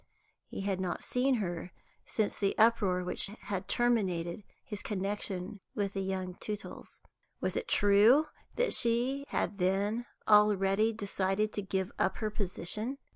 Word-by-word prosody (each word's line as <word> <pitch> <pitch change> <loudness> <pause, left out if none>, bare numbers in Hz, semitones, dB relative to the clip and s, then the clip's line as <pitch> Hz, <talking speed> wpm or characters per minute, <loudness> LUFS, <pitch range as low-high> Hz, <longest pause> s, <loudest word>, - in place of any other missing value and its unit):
He - - -6
had 195 -1 -1
not 180 -2 -3
seen 255 +1 +2
her 175 -5 -3 0.4
since 215 -2 0
the 195 -1 0
uproar 205 -5 +4
which 180 - 0
had 190 -2 -4
terminated 200 -7 +1 0.2
his 210 -2 -5
connection 195 -1 -3 0.2
with 200 -1 -1
the 195 - -2
young 190 -1 -3
Tootles. 210 -1 -7 0.4
Was - - -2
it - - -2
true 210 +9 +5 0.3
that - - +1
she 245 +4 +2
had 205 - -2
then 200 +6 +1 0.2
already 210 0 +5
decided 200 -1 -1
to 205 - -1
give 190 -1 -2
up 190 - +1
her 215 -1 -2
position? 210 +5 -3
200 Hz, 140 wpm, -31 LUFS, 190-220 Hz, 0.4 s, true